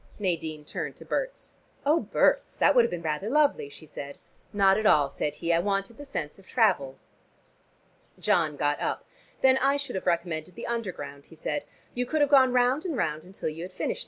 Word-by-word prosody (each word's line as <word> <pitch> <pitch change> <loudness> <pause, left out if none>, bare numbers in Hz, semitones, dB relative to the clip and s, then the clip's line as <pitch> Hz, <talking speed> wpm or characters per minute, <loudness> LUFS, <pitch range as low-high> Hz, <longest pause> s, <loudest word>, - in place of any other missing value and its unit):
Nadine 160 -6 -2
turned - - -5
to - - -13
Berts. - - -4 0.3
"Oh, 305 +4 +4
Berts, - - +1
that - - +5
would 245 -3 +6
have 230 - +1
been 175 -1 -5
rather 160 +6 -2
lovely," 290 - +2
she 145 +3 -12
said. 140 -2 -8 0.3
"Not 195 0 +4
at 215 - +2
all," 145 -6 +4
said 150 +1 -2
he. 170 +2 0
"I 165 - +4
wanted 195 +5 -1
the 290 - -8
sense 155 - -5
of 195 - -19
travel." 180 - +2 1.2
John 155 -3 +2
got 145 0 +1
up. - - -2 0.4
"Then 265 0 +5
I 275 +2 +3
should 280 -1 -4
have 190 - -4
recommended 170 -1 -1
the - - -6
Underground," 180 -12 -5
he 165 - -15
said. 285 - -3 0.3
"You 250 0 -2
could 310 +3 0
have 290 -1 +3
gone 260 -2 +7
round 250 +4 +3
and 335 -8 -3
round 155 -6 -1
until 185 -2 -5
you 155 +2 -7
had 180 +2 -6
finished. - - -2
190 Hz, 205 wpm, -27 LUFS, 155-250 Hz, 1.2 s, gone